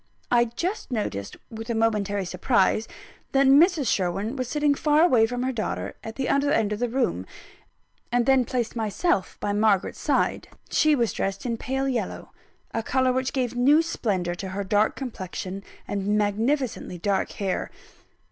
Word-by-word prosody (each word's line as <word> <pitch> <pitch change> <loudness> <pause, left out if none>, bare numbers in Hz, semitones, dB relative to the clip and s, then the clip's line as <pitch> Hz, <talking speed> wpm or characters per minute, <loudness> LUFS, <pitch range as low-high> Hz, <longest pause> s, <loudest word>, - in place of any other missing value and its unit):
I 240 -1 +5
just 340 - -4
noticed 155 - -3
with 225 +1 -7
a 235 - 0
momentary 205 -3 0
surprise 200 +3 +1 0.5
that 275 0 +4
Mrs. 295 +3 +5
Sherwin 195 +6 0
was 255 -2 -3
sitting 295 +2 +2
far 300 +2 +3
away 240 -10 +5
from 245 +1 -3
her 260 - 0
daughter, 225 -4 -3
at 225 0 -7
the 270 - -2
other 280 +1 +2
end 215 -7 +2
of 210 - -4
the 245 0 0
room; 230 - -1 0.8
and 240 0 +2
then 265 -1 +4
placed 240 -1 -2
myself 220 - 0
by 205 - -1
Margaret's 205 -2 +2
side. - - 0 0.2
She 310 -1 +4
was 235 -4 0
dressed 195 +3 -3
in 235 -2 -1
pale 265 +4 -2
yellow 255 -3 -3 0.4
a 225 - 0
colour 260 +2 +1
which 260 0 -1
gave 255 -3 -1
new 285 +6 +5
splendour 190 - -1
to 190 +2 -6
her 200 +2 -3
dark 205 +2 +2
complexion 195 -6 -6 0.3
and 205 +1 0
magnificently 220 0 -1
dark 195 +2 -1
hair. 195 -2 -2
230 Hz, 165 wpm, -25 LUFS, 205-265 Hz, 0.8 s, I